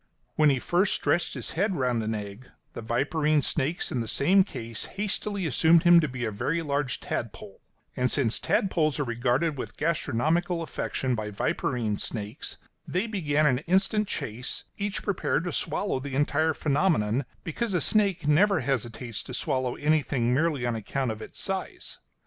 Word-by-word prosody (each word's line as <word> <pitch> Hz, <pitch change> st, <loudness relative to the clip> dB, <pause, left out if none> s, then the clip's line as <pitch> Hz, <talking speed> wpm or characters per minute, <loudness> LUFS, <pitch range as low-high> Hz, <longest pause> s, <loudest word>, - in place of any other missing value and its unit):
When 155 Hz, -1 st, +5 dB
he 135 Hz, -, +3 dB
first 180 Hz, +9 st, +1 dB
stretched 175 Hz, -, 0 dB
his -, -, -2 dB
head 195 Hz, +3 st, 0 dB
round 125 Hz, -5 st, 0 dB
an 110 Hz, 0 st, -2 dB
egg, 105 Hz, +4 st, -7 dB, 0.2 s
the -, -, -6 dB
viperine 145 Hz, +6 st, +1 dB
snakes 155 Hz, +3 st, 0 dB
in 125 Hz, -, -1 dB
the 115 Hz, -, -4 dB
same 185 Hz, -, +4 dB
case 115 Hz, -, -4 dB
hastily 205 Hz, -1 st, -2 dB
assumed 160 Hz, +3 st, +4 dB
him 175 Hz, 0 st, +8 dB
to 155 Hz, -, +1 dB
be 125 Hz, -2 st, -4 dB
a 110 Hz, -, -2 dB
very 150 Hz, +11 st, -1 dB
large 140 Hz, -3 st, -1 dB
tadpole; -, -, -5 dB, 0.3 s
and 125 Hz, 0 st, +1 dB
since 120 Hz, -5 st, +2 dB
tadpoles 165 Hz, -, +1 dB
are -, -, +2 dB
regarded 125 Hz, +5 st, 0 dB
with -, -, -6 dB
gastronomical 165 Hz, +3 st, 0 dB
affection 130 Hz, -4 st, -2 dB
by 110 Hz, -2 st, -3 dB
viperine 105 Hz, +1 st, -1 dB
snakes, 105 Hz, +2 st, -4 dB, 0.3 s
they 185 Hz, +5 st, 0 dB
began 155 Hz, -9 st, +1 dB
an 130 Hz, -4 st, +3 dB
instant 195 Hz, +4 st, +2 dB
chase, 120 Hz, -, -3 dB, 0.2 s
each 205 Hz, 0 st, -2 dB
prepared 190 Hz, -5 st, 0 dB
to 175 Hz, -, -3 dB
swallow 200 Hz, -10 st, -1 dB
the 135 Hz, 0 st, -5 dB
entire 145 Hz, +2 st, +2 dB
phenomenon, 140 Hz, -, +1 dB, 0.2 s
because 195 Hz, +4 st, -2 dB
a -, -, +3 dB
snake 195 Hz, -7 st, +2 dB
never 195 Hz, +7 st, +4 dB
hesitates 120 Hz, -3 st, -2 dB
to 130 Hz, -, -5 dB
swallow 130 Hz, -1 st, -1 dB
anything 145 Hz, -5 st, +1 dB
merely 150 Hz, -2 st, +1 dB
on 120 Hz, -1 st, 0 dB
account 115 Hz, +3 st, -2 dB
of 110 Hz, 0 st, -7 dB
its -, -, -8 dB
size. 195 Hz, -1 st, -4 dB
145 Hz, 165 wpm, -27 LUFS, 120-175 Hz, 0.3 s, him